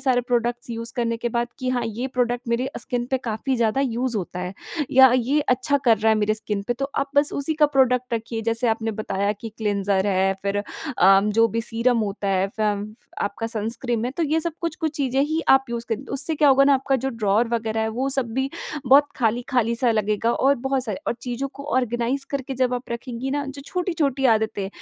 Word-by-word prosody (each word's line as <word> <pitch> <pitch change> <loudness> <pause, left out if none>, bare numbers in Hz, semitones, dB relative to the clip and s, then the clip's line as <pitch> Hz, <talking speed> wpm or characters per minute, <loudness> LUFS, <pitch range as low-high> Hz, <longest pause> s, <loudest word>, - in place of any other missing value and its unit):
सारे 255 -2 +2
products 240 0 -1
use 230 0 -5
करने 230 -1 0
के 240 +1 -2
बाद 235 +1 -1
कि 255 -1 -3
हाँ, 245 -1 0
ये 230 +4 -3
प्रोडक्ट 245 -1 -1
मेरे 235 +2 0
अ, 270 - -6
स्किन 245 -1 -3
पे 265 - +1
काफ़ी 245 +2 -2
ज़्यादा 230 +2 +1
यूज़ 250 -2 -1
होता 180 -2 -4
है 180 +1 -5 0.4
या 265 -2 +7
ये 260 +5 +1
अच्छा 275 +1 +1
कर 225 -3 +5
रहा 220 +1 +2
है - - +5
मेरे 215 +1 +1
स्किन 210 -2 -3
पे, - - +3
तो 275 +2 -4
आप 275 0 -1
बस 285 +1 +3
उसी 285 +3 -1
का 305 -1 +4
प्रोडक्ट 255 -3 +2
रखिए। 225 0 -4
जैसे 230 +1 0
आपने 225 0 0
बताया 200 -1 -1
कि 225 +2 -8
क्लिंजर 200 -2 0
है 190 0 +2
फिर 200 0 -1
अ, 195 - +3
जो 225 +2 +3
भी 230 +2 -2
सीरम 230 +1 +1
होता 200 -1 -2
है 190 0 +2
फम 210 -1 -1
फ 240 - -28 0.2
आपका 205 +3 -3
सनस्क्रीन 230 +1 -1
है, 245 - -1
तो 330 +5 -3
ये 315 +1 +1
सब 335 +1 -2
कुछ 335 -2 -2
कुछ 315 -3 -1
चीज़ें 270 -1 0
ही 315 +2 0
आप 270 0 +6
यूज़ 235 0 -3
करिए, 230 +3 -2
उससे 315 +4 -1
क्या 295 -1 +4
होगा 275 0 +6
ना 280 0 +5
आपका 270 0 +1
जो 270 - -1
ड्रॉवर 225 0 +1
वग़ैरह 225 -1 -1
है, 220 - 0
वो 250 +5 -2
सब 270 -2 0
भी 265 +1 0 0.4
बहुत 285 +3 +6
खाली-खाली 235 0 +1
सा 240 0 +2
लगेगा 215 +1 +1
और 275 +2 +3
बहुत 265 +1 -1
स 215 -4 -3
और - - 0
चीज़ों 250 +2 -3
को 280 - -8
आर्गेनाइज़ 245 +2 0
करके 275 -1 -3
जब 255 -1 +1
आप 245 0 -6
रखेंगी 240 +2 -4
ना 285 +1 -1
जो 275 0 -7
छोटी-छोटी 315 -7 -1
आदतें 220 -4 +1
240 Hz, 225 wpm, -23 LUFS, 220-270 Hz, 0.4 s, या